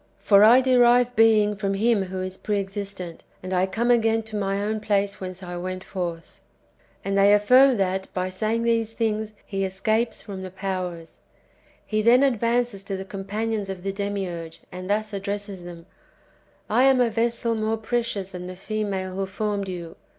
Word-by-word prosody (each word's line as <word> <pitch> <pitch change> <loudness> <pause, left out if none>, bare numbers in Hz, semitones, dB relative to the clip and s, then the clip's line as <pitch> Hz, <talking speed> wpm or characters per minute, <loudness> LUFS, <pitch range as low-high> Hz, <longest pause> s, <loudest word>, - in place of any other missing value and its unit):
For 200 -1 +5
I 240 +4 +8
derive 245 -1 +4
being 215 -2 +4
from 195 -1 -2
Him 215 -1 +2
who 185 0 -4
is 185 0 -4
pre 205 +1 -2
existent, 195 -3 -6 0.2
and 185 0 -4
I 185 +1 +2
come 235 +5 0
again 225 -1 +3
to 220 -1 -8
my 195 -1 -1
own 215 +2 -1
place 200 -1 0
whence 185 0 -6
I 175 -1 -6
went 185 +1 -5
forth." 170 -3 -6 0.7
And 195 0 -1
they 200 +1 +5
affirm 250 +5 +5
that, 190 0 -1
by 185 0 -2
saying 220 +4 -1
these 230 -1 +1
things, 220 -1 -1
he 195 -1 -2
escapes 215 +5 0
from 195 -3 -8
the 190 - -6
powers. 185 -3 -5 0.7
He 215 0 0
then 240 +4 +5
advances 235 -4 +1
to 195 -1 -3
the 190 - -6
com 195 -1 -7
panions 215 0 -2
of 185 -2 -6
the 195 0 -2
Demiurge, 190 -5 -4
and 185 +1 -7
thus 215 +1 -1
addresses 200 -1 -4
them: 170 -1 -10 0.3
— - - -34
" - - -35
I 245 +5 +3
am 265 -1 +5
a 240 -2 +3
vessel 230 +1 0
more 220 0 -1
precious 220 -4 -2
than 180 0 -7
the 185 - -7
female 195 -2 -3
who 195 0 -2
formed 200 0 -2
you. 170 -3 -7
200 Hz, 185 wpm, -24 LUFS, 190-225 Hz, 0.7 s, I